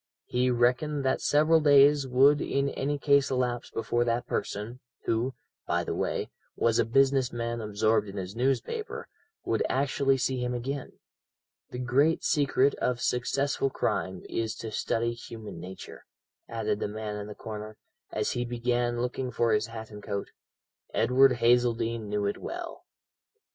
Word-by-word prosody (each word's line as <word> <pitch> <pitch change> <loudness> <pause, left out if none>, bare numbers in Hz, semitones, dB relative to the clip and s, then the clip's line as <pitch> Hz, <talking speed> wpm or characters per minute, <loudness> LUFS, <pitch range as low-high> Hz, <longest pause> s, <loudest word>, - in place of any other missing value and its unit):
He 125 +1 +1
reckoned 125 +4 +1
that 130 - +1
several 155 +2 +4
days 145 -1 +5
would 135 +3 +5
in 140 0 0
any 145 +2 -2
case 140 -1 +3
elapse 125 -2 -1
before 115 +2 0
that 120 +1 0
person, 110 +5 -4 0.3
who, 120 +4 0 0.3
by - - +1
the - - -3
way, - - -2 0.2
was 115 -1 +2
a - - +3
business 135 +1 +3
man 115 0 -3
absorbed 105 0 +1
in 100 +1 -8
his 95 +1 -5
newspaper, 135 - -2 0.4
would 115 - 0
actually 135 0 +2
see 130 0 -1
him 125 0 -1
again. 135 +3 -4 0.8
The - - -7
great 135 +6 +2
secret 140 -1 +3
of 125 -1 0
successful 135 +3 0
crime 95 -7 -2
is 110 -1 -2
to 110 - -6
study 115 +2 -1
human 110 -5 -9
nature," 95 +2 -10 0.4
added 110 -2 -1
the - - -1
man 105 0 -5
in 105 0 -6
the 105 - -8
corner, 110 0 -7 0.3
as - - -1
he 120 - -1
began 120 0 -1
looking 125 +1 -2
for 115 -2 +1
his 105 +1 +1
hat 110 -1 -8
and 105 0 -9
coat. 100 -1 -4 0.6
"Edward 130 +1 +5
Hazeldene 115 -2 +2
knew 105 0 0
it 100 - -2
well." - - -7
120 Hz, 155 wpm, -28 LUFS, 110-135 Hz, 0.8 s, days